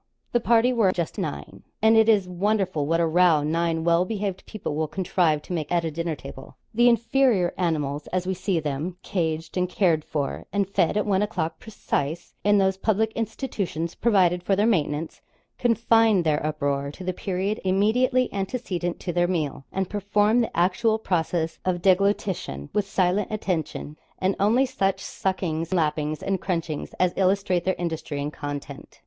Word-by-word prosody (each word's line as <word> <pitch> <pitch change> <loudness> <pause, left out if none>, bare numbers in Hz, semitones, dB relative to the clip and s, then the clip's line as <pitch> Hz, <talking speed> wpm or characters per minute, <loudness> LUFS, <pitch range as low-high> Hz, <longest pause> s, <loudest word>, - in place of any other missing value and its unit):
The 240 - +3
party 235 +2 +3
were 220 -6 +3
just 170 -3 -3
nine 70 0 -5 0.2
and 220 +1 +5
it 220 0 +5
is 200 -4 +4
wonderful 185 -4 0
what 165 +2 +2
a 170 - +3
row 165 -2 +4
nine 165 +1 0
well 170 +1 +3
behaved 200 -1 -4
people 215 -8 -5
will 155 +1 -1
contrive 170 -4 0
to - - -6
make 155 -4 -3
at 170 -1 +1
a 160 - -2
dinner 165 +1 -2
table. 135 -1 -11 0.2
The 240 +2 +5
inferior 230 -4 +2
animals 150 -4 -1
as 185 0 -2
we 190 - 0
see 185 -1 -1
them 155 +4 -3
caged 160 -2 -2
and 180 0 +1
cared 170 -5 +2
for, 145 -3 -3
and 200 -2 0
fed 195 -1 +1
at 210 - +1
one 195 -2 +2
o'clock, 180 -6 -2
'precise,' 170 -6 -3
in 205 0 +4
those 190 -1 +2
public 220 +2 +1
institutions 200 - -3
provided 185 -6 +2
for 195 +2 +1
their 205 +2 +2
maintenance 160 -7 0 0.4
confine 225 -4 +3
their 150 -2 +1
uproar 140 -2 -1
to 185 - -9
the 185 0 -2
period 190 +3 -2
immediately 240 +7 +2
antecedent 190 -4 -3
to 175 - -3
their 175 0 +2
meal, 155 -6 -2
and 190 -1 -1
perform 210 +3 +2
the 230 - -3
actual 205 +6 +2
process 165 -5 -1
of 175 -2 -1
deglutition 190 - +1
with 205 -1 0
silent 185 +2 +1
attention, 170 -7 -3 0.2
and 190 +1 0
only 230 +7 +4
such 195 -7 0
suckings, 170 -4 -3
lappings, 155 -3 0
and 195 -1 -1
crunchings, 165 -5 -3
as 180 -1 +2
illustrate 190 -2 +1
their 185 - +1
industry 160 -4 -3
and 145 +1 -3
content. 145 -1 -7
180 Hz, 170 wpm, -25 LUFS, 160-205 Hz, 0.4 s, and